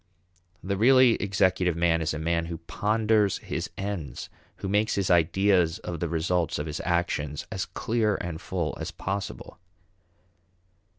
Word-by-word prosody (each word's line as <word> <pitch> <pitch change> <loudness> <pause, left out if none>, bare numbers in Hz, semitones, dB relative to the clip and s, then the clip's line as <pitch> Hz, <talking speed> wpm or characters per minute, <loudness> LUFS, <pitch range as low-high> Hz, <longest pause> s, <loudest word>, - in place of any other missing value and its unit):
The 100 +1 -1
really 130 +2 +6
executive 95 -3 +2
man 85 -1 +2
is 80 - 0
a 75 - -3
man 85 +1 0
who 85 -1 -5
ponders 105 +4 +1
his - - -4
ends, 95 -7 -5 0.2
who - - -6
makes 105 +2 +1
his 95 -2 0
ideas 90 +1 +3
of 85 -7 -6
the - - -2
results 85 0 0
of 75 - -3
his 75 -1 -4
actions 85 -4 -1
as - - -3
clear 110 -2 0
and 85 -2 -5
full 85 -4 -2
as - - -3
possible. 95 -2 -5
90 Hz, 145 wpm, -27 LUFS, 85-100 Hz, 0.2 s, really